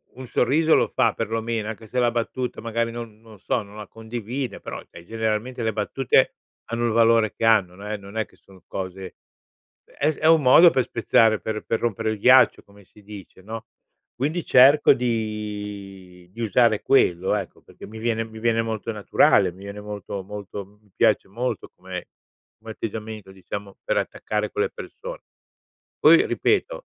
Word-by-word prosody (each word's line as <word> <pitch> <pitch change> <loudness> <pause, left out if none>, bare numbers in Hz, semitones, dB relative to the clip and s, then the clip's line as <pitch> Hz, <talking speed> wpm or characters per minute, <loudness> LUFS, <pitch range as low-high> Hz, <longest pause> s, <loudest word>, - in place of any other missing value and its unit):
un 130 -1 -9
sorriso 155 +8 +3
lo - - +3
fa - - +2
perlomeno, 115 -1 -3
anche 110 0 -8
se 125 - -2
la 120 -1 +3
battuta, 120 +1 -3
magari, 115 0 -2
non 115 -2 -8
non 110 -3 -16
so, 110 +2 -1
non 100 +1 -15
la 105 -2 -8
condivide, 115 +1 -5
però, - - -7
cioè, 85 - -12
generalmente, 110 +3 -2
le 110 -1 0
battute 115 +4 +1 0.3
hanno 120 0 -2
il 115 - +1
valore 115 -1 +4
che - - -7
hanno. 100 -6 +3
Non 100 +2 -9
è 105 0 -3
non 100 +2 -11
è 110 - 0
che - - -25
sono 95 -2 -20
cose 95 0 -6 0.7
è 150 - -1
è 155 - 0
un 160 -1 +6
modo 160 +7 +8
per 130 - +2
spezzare, 115 -2 +2
per 110 -1 -4
per 115 - -1
rompere 115 -1 -1
il 110 - -5
ghiaccio, 130 +4 +5
come 100 0 -19
si 105 +3 -21
dice, 100 -2 -12
no, 110 +3 -7 0.5
quindi 155 +7 -2
cerco 135 +4 +6
di 105 -6 -5
di 115 - -8
usare 115 0 +3
quello, 95 -9 +3
ecco, 100 -3 -6
perché - - -13
mi 110 +1 -10
viene 115 0 -1
mi 110 0 -11
viene 115 0 +1
molto 115 0 -4
naturale, 100 -2 +3
mi 95 +2 -14
viene 100 +1 -8
molto 105 -1 -6
molto 100 0 -7 0.2
mi 105 -3 -29
piace - - +2
molto 120 +1 -4
come - - -8 0.5
come 110 0 -10
atteggiamento, 110 -2 -6
diciamo, 100 +1 -8
per - - -1
attaccare - - -2
quelle 430 +2 -1
persone. - - -9 0.8
Poi, - - +6
ripeto, - - 0
110 Hz, 175 wpm, -23 LUFS, 105-120 Hz, 0.8 s, modo